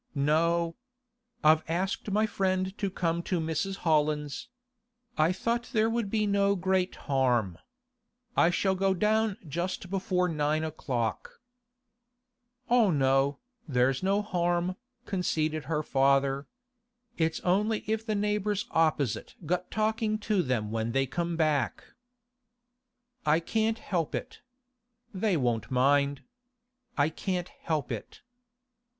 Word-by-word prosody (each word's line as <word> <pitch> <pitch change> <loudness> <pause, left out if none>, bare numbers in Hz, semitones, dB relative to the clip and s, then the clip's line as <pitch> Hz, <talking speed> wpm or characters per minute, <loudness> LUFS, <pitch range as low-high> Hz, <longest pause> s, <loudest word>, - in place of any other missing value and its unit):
'No. 165 +4 +2 0.7
I've 155 +1 +6
asked 185 +5 -2
my 210 +2 +2
friend 190 -2 -1
to 200 - 0
come 170 -2 -1
to 175 0 -1
Mrs. 160 +4 -1
Holland's. 150 -2 +1 0.7
I 155 +3 +3
thought 235 +6 -1
there 220 0 +3
would 230 -3 -1
be 215 0 +1
no 200 0 +2
great 185 0 0
harm. 120 -10 +1 0.8
I 170 - +5
shall 190 +2 +1
go 190 0 +1
down 215 +1 +1
just 175 +4 -3
before 185 -2 +1
nine 155 -1 0
o'clock.' 130 -7 -3 1.3
'Oh 235 -3 +4
no, 135 -2 +2 0.3
there's 130 -1 +2
no 200 +2 +1
harm,' 175 -2 0 0.3
conceded 155 - -1
her 150 +1 -1
father. 135 0 +2 0.7
'It's 160 0 +1
only 210 +4 +1
if 220 +1 -1
the 215 -1 -1
neighbours 210 0 0
opposite 155 -6 +1
got 180 +3 -1
talkin' 215 0 0
to 210 -2 +1
them 120 -8 -1
when 115 +1 -2
they 135 0 +2
come 170 +5 -2
back.' 150 -7 +1 1.4
'I 150 +2 +5
can't 220 +5 0
help 170 -8 -2
it. - - -6 0.7
They 195 -1 +1
won't 120 -5 0
mind. 140 +2 +2 0.7
I 145 +1 +3
can't 180 +2 -3
help 155 -5 -3
it. - - -7
170 Hz, 120 wpm, -29 LUFS, 145-200 Hz, 1.4 s, I've